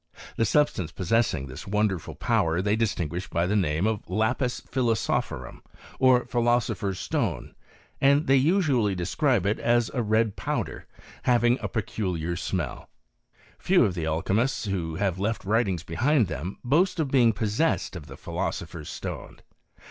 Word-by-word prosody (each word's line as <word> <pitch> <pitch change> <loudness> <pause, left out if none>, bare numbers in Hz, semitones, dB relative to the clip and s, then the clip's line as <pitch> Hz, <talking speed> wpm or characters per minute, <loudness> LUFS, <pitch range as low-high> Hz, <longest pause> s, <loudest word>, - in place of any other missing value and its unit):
The 115 - +1
substance 100 - +1
possessing 95 - 0
this 65 +2 -9
wonderful 100 -4 -1
power 80 +1 +1
they 105 +3 +1
distinguish 90 -6 -2
by 85 0 0
the 100 +3 0
name 85 -2 +1
of 110 -2 0
Iqpi&^philosopkorum, 115 +2 -1 0.4
or, 130 -2 +5
philosopher's 120 -5 0
stone, - - -2 0.5
and 140 +2 +4
they 135 - +4
usually 135 - +2
describe 95 - +1
it 105 +3 +1
as 120 -1 +2
a 125 - 0
red 110 -1 +1
powder, - - -3 0.4
havinff 120 0 +3
a - - -2
peculiar 90 -6 -2
smell. 90 -1 -4 0.7
Few 180 -7 +4
of 100 - 0
the 85 -3 -3
alchymists 105 +11 0
who 85 -5 -2
have 95 0 -1
left 110 +2 -2
writings 100 -5 +1
behind 130 +4 +2
them 85 +5 -5
boast 170 +8 +2
of 145 -4 -1
being 120 -4 +5
pos 105 0 -3
•ened 165 -10 +1
of 80 -4 -8
the - - -10
philosopher's - - -4
stone. - - -7
110 Hz, 145 wpm, -26 LUFS, 90-125 Hz, 0.7 s, or